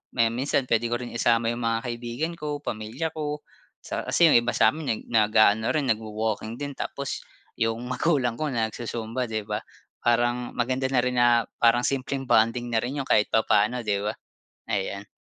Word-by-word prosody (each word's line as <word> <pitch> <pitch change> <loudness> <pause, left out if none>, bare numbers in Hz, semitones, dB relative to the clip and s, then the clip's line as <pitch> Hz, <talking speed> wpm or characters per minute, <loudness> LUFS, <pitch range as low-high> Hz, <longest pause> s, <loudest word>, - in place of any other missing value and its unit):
may 115 -2 +4
minsan 135 +3 0
puwede 115 0 +2
ko 120 - -1
rin 120 - -6
isama 115 -1 +2
yung 120 - -4
mga 115 0 +1
kaibigan 120 +7 -3
ko, 150 -1 -4
pamilya 110 +10 -3
ko 150 -1 -4 0.4
sa - - -4
kasi 170 -2 +5
yung - - +7
iba 120 0 -2
sa'min 155 -1 +3
neg 110 - -1
naga-ano 110 0 +4
rin, 145 -4 0
nagwa-walking 110 0 -2
din 145 0 -3
tapos 140 -1 -4 0.3
yung 115 0 0
magulang 130 -3 +1
ko 155 -2 -2
nagzu-zumba, 115 +1 -2
'di 110 -2 -3
ba, 105 - 0 0.5
parang 120 +1 +1
maganda 130 +2 -1
na 125 - +4
rin 125 0 -1
na 120 - +5 0.3
parang 120 +1 +4
simpleng 135 0 -2
bonding 115 +2 +3
na 115 - 0
rin 130 +5 -1
yun 135 - -7
kahit 105 - +4
papaano, 110 +2 +3
di 105 -3 0
ba? 105 - -1 0.6
Ayan. 100 +1 -2
120 Hz, 180 wpm, -26 LUFS, 110-130 Hz, 0.6 s, yung